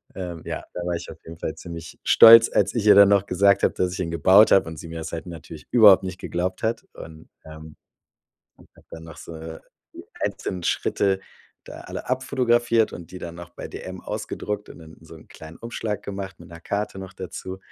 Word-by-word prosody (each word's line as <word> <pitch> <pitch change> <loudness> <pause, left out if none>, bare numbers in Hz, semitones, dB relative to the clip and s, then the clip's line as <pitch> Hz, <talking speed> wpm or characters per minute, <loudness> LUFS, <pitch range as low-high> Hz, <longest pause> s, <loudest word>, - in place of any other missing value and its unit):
ähm, 90 -4 -7
ja, - - -5
da 90 - -5
war 90 - -1
ich 85 - -7
auf - - -12
jeden 80 0 -11
Fall 80 - -4
ziemlich 85 -2 -9
stolz, 115 0 +8
als - - +2
ich 110 -3 -1
ihr 105 - +7
dann 100 0 +8
noch 100 -1 +3
gesagt 100 +1 +3
hab, - - +2
dass 90 -1 -1
ich 95 - -7
ihn 85 -2 -3
gebaut 95 +6 +5
hab 95 - +5
und 80 -1 -8
sie 85 - -9
mir 80 0 -7
das 80 - -6
halt 85 - -5
natürlich 80 -2 -10
überhaupt 105 -6 +7
nicht 90 -1 -6
geglaubt 90 +2 -4
hat. 115 +1 -1
Und, 80 0 -12 0.2
ähm, 80 0 -12 1.0
hab - - -21
dann 80 - -10
noch 80 -2 -12
so, 85 - -10
äh, 80 0 -9 0.3
die - - -11 0.2
einzelnen 90 -2 -3
Schritte 95 +3 0 0.5
da - - -10
alle - - -8
abfotografiert 120 -3 +1
und 85 -2 -10
die 90 - -7
dann 85 -1 -8
noch 85 0 -10
bei - - -9
dm - - -8
ausgedruckt 105 0 -5
und - - -12
dann 80 -1 -13
in - - -21
so 80 - -13
'n 80 - -18
kleinen 80 +1 -12
Umschlag 115 -2 -5
gemacht 100 -1 -7
mit 85 - -13
'ner 85 -1 -12
Karte 100 +1 -4
noch 95 -1 -9
dazu. 95 0 -7
90 Hz, 220 wpm, -23 LUFS, 85-100 Hz, 1.0 s, stolz